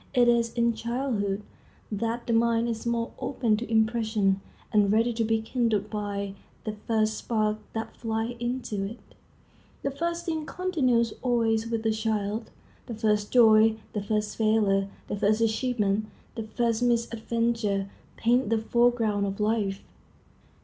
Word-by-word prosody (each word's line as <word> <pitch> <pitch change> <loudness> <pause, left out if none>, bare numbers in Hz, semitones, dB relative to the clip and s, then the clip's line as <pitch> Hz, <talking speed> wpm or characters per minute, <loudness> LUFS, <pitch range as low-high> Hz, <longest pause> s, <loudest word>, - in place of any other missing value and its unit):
It 245 -1 +5
is 235 -1 +3
in 235 -1 +2
childhood 225 -4 -2 0.5
that 230 +3 -2
the 235 - 0
mind 230 0 +3
is 230 0 -3
most 235 0 -1
open 240 -5 +1
to 230 +1 -5
impression, 220 -3 +2 0.3
and 205 -2 +4
ready 230 +3 +3
to 230 0 0
be 220 0 +1
kindled 220 -3 0
by 200 -2 -3 0.3
the 215 - -3
first 220 -1 +2
spark 215 -2 0
that 225 0 -4
flies 225 +1 -2
into 240 -4 -2
it. 210 +5 -5 0.9
The 280 - 0
first 340 +4 -3
thing 315 -2 -2
continues 255 - +1
always 230 -3 +1
with 230 -1 -2
the 220 - +2
child. 215 0 -2 0.4
The 235 - -5
first 210 -2 +1
joy, 220 -2 +6 0.2
the 210 - -1
first 210 +1 -2
failure, 210 -3 +2 0.2
the 205 - -3
first 210 +2 +2
achievement, 220 -2 +1 0.3
the 225 -2 -5
first 230 0 0
misadventure, 230 -3 0 0.3
paint 240 0 +2
the 225 - +3
foreground 225 -3 +2
of 195 +1 -4
life. 210 -2 0
225 Hz, 145 wpm, -27 LUFS, 210-235 Hz, 0.9 s, joy